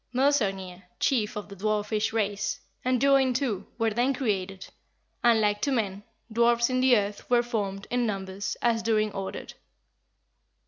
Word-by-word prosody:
Modsognir, 195 -10 +1 0.2
chief 235 -4 +1
Of 210 - -5
the 200 - -10
dwarfish 215 +2 0
race, 205 -3 -1 0.2
And 255 0 +1
Durin 270 -2 +4
too 245 -7 -1
Were 225 -1 +1
then 245 +5 +1
created. 195 -7 -2 0.6
And 235 -2 +5
like 205 -1 +1
to 280 - +1
men 205 -6 -1 0.3
Dwarfs 235 +1 +3
in 255 - +1
the 255 -2 +5
earth 205 0 -3
Were 240 -1 +4
formed 205 -4 -3
in 245 -1 +1
numbers 190 -1 -4
As 230 -1 +2
Durin 215 -1 +1
ordered.'" 195 -1 -6
220 Hz, 150 wpm, -27 LUFS, 200-245 Hz, 0.6 s, And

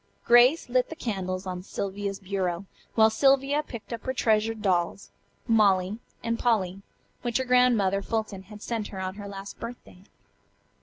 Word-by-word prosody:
Grace 245 +7 +6
lit 250 0 +1
the 320 - -6
candles 190 - -3
on 180 -1 -4
Sylvia's 200 +1 -4
bureau, 190 -2 -2 0.3
while 220 -1 +6
Sylvia 275 +3 +3
picked 235 -5 -8
up 230 - -5
her 260 0 -2
treasured 220 -1 +1
dolls, 180 0 0 0.4
"Molly" 205 -2 +3 0.2
and 230 0 -1
"Polly," 195 -5 +1 0.4
which 240 -2 0
her 260 - -1
Grandmother 240 -6 +3
Fulton 215 -2 -3
had 210 -1 -10
sent 225 -3 -2
her 195 - -8
on 185 0 -3
her 205 0 -8
last 195 0 -8
birthday. 235 -6 -9
215 Hz, 155 wpm, -27 LUFS, 195-240 Hz, 0.4 s, Grace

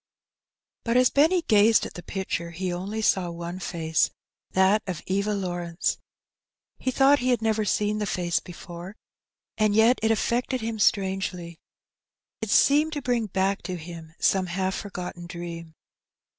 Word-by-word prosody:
But 230 +1 +1
as 250 0 +5
Benny 325 +5 +3
gazed 215 -3 +4
at - - -8
the 175 - -8
picture 185 -2 -4
he 180 +2 -3
only 200 +5 -4
saw 185 -4 +2
one 170 +1 -6
face, 160 -3 0 0.4
that 190 +3 +3
of 180 -3 -4
Eva 200 +2 0
Lawrence. 175 -3 -2 0.8
He 260 - -1
thought 275 +2 +4
he 255 - 0
had 240 -3 +1
never 220 -1 +1
seen 210 +1 0
the 210 - -2
face 175 -2 0
before, 175 +2 -10 0.6
and 215 -1 +3
yet 225 +3 +5
it 220 - +2
affected 240 +3 0
him 225 0 -3
strangely. 190 -4 0 0.8
It 220 - -3
seemed 300 +8 +4
to 290 - -3
bring 240 -3 0
back 195 +1 0
to 185 - -4
him 165 -1 -9
some 190 -1 +2
half 190 +2 -1
forgotten 180 -4 -6
dream. 170 -2 -7
195 Hz, 155 wpm, -26 LUFS, 175-220 Hz, 0.8 s, as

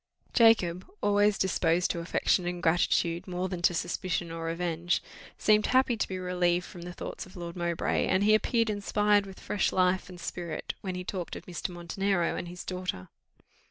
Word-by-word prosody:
Jacob, 190 -7 +4
always 205 0 +3
more - - -8
disposed 175 -1 +2
to 170 - -3
affection 175 +1 +1
and 175 0 -4
gratitude 170 0 +2
than 180 0 -3
to 175 - +4
suspicion 175 0 -2
or 165 0 -5
revenge, 170 +1 0 0.4
seemed 215 0 +4
happy 255 -1 +3
to 220 - -1
be 190 - -4
relieved 180 -1 +1
from 175 - -10
the 175 +1 -6
thoughts 175 - -7
of 185 - -16
Lord 170 -1 -6
Mowbray, 170 -1 0
and 185 +1 +2
he 215 +1 +5
appeared 225 +1 +2
inspired 205 0 +2
with 190 - -11
fresh 205 - 0
life 185 0 +2
and 180 -1 -10
spirit 170 -3 -4
when 185 -2 -4
he 180 - -4
talked 180 -2 -4
of - - -9
Mr. 180 +1 -4
Montenero 175 +1 -1
and - - -4
his 175 +1 -8
daughter. 180 - -4
180 Hz, 185 wpm, -29 LUFS, 175-195 Hz, 0.4 s, he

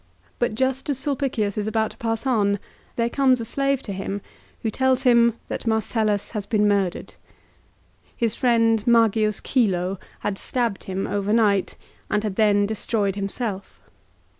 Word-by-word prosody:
But 240 -3 0
just 265 +3 -1
as 280 - 0
Sulpicius 265 -7 -1
is 210 - -2
about 220 0 0
to 215 - -17
pass 225 +1 -2
on 205 -6 +2 0.4
there 230 0 +1
comes 260 0 +3
a 230 - -4
slave 275 +3 0
to 200 - -5
him 195 +1 -4 0.4
who 220 - 0
tells 260 +2 +1
him 235 -2 +5
that - - -5
Marcellus 220 -2 0
has 210 -3 -4
been 210 -2 +2
murdered. 200 -3 0 1.0
His 230 -2 0
friend 230 -3 +2
Magius 220 -3 +3
Chilo 190 -6 0 0.2
had 195 -1 -2
stabbed 235 -6 -2
him 190 0 -3
overnight, 205 -1 +1 0.3
and 210 +1 0
had 210 -3 -2
then 205 -1 +3
destroyed 205 -1 -1
himself. 200 0 -4
220 Hz, 150 wpm, -23 LUFS, 205-240 Hz, 1.0 s, him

